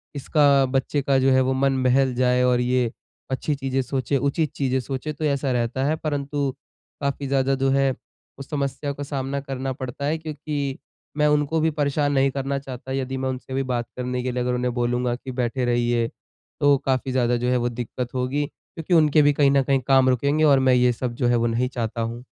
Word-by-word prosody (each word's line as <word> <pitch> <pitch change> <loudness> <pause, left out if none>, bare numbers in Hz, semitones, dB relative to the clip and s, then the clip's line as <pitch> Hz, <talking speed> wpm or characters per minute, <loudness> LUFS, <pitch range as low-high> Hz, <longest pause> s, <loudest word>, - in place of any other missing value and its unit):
इसका 140 -1 +3
बच्चे 135 +2 0
का 135 0 +2
जो 135 +1 +3
है 130 0 +4
वो 130 0 +1
मन 135 0 +1
बहल 130 +1 +3
जाए 125 0 +2
और 125 -1 +3
ये 125 -1 +1 0.4
अच्छी 140 +3 -1
चीज़ें 135 -1 -1
सोचे, 130 +1 -1
उचित 140 +2 0
चीज़ें 130 -2 0
सोचे, 135 +3 -4
तो 155 +2 -4
ऐसा 140 -2 0
रहता 120 +1 -1
है। 155 +2 +1
परंतु 145 -2 -2 0.5
काफ़ी 140 0 -2
ज़्यादा 135 0 +1
जो 135 0 +1
है, 135 0 +2 0.4
उस 135 -1 -9
समस्या 140 0 -2
का 145 - -6
सामना 140 -1 -3
करना 135 -1 -4
पड़ता 130 +2 -6
है 155 +3 0
क्योंकि 150 -3 -4 0.4
मैं 150 0 +3
उनको 150 +1 +2
भी 160 +1 +2
परेशान 145 -1 0
नहीं 135 0 +3
करना 140 +1 -2
चाहता। 130 -1 -8
यदि 135 0 -2
मैं 130 0 -2
उनसे 130 0 -6
भी 135 +1 0
बात 120 -1 -1
करने 125 0 -2
के 130 - -1
लिए 125 0 -2
अगर 125 0 0
उन्हें 125 0 -1
बोलूँगा 120 0 0
कि 130 +1 -8
बैठे 125 0 -1
रहिए, 120 -1 +1 0.5
तो 145 -1 +5
काफ़ी 130 0 0
ज़्यादा 120 -1 +1
जो 125 +1 -1
है 125 - +2
वो 120 0 0
दिक्कत 120 +1 -5
होगी 130 +3 0
क्योंकि 165 +4 -7
उनके 155 -2 +5
भी 145 0 +4
कहीं 140 -1 +3
न 140 -1 +3
कहीं 135 0 +2
काम 135 -1 +5
रुकेंगे 140 +5 +1
और 140 -3 +6
मैं - - +6
ये 125 0 +4
सब 120 0 -3
जो 125 0 0
है 120 - +3
वो 120 0 +1
नहीं 120 +2 0
चाहता 115 -2 -3
हूँ। 115 +2 -4
135 Hz, 215 wpm, -23 LUFS, 125-140 Hz, 0.5 s, और